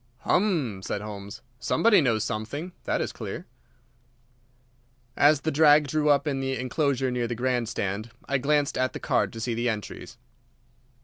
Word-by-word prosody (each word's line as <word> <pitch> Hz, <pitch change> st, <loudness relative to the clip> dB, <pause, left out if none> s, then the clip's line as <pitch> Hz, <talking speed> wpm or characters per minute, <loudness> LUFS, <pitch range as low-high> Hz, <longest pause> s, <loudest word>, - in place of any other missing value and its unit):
"Hum!" 155 Hz, -, +1 dB
said 100 Hz, -, -3 dB
Holmes. 100 Hz, 0 st, -8 dB, 0.2 s
"Somebody 210 Hz, -, +4 dB
knows 115 Hz, -6 st, +1 dB
something, 120 Hz, +11 st, -4 dB
that -, -, 0 dB
is -, -, -2 dB
clear." -, -, -6 dB, 1.7 s
As 145 Hz, -1 st, +4 dB
the 160 Hz, -, -1 dB
drag 150 Hz, -1 st, +5 dB
drew 150 Hz, +1 st, +1 dB
up 140 Hz, 0 st, +4 dB
in 140 Hz, -3 st, -1 dB
the 135 Hz, 0 st, -2 dB
enclosure 130 Hz, 0 st, 0 dB
near 120 Hz, -1 st, -1 dB
the 120 Hz, -, -3 dB
grand 120 Hz, -1 st, 0 dB
stand 105 Hz, 0 st, -3 dB, 0.2 s
I 140 Hz, -1 st, +1 dB
glanced 145 Hz, +1 st, +1 dB
at 130 Hz, 0 st, 0 dB
the -, -, -5 dB
card -, -, +1 dB
to 115 Hz, -, -7 dB
see 115 Hz, +1 st, -2 dB
the 120 Hz, +1 st, 0 dB
entries. 110 Hz, +2 st, -6 dB
130 Hz, 165 wpm, -26 LUFS, 115-145 Hz, 1.7 s, drag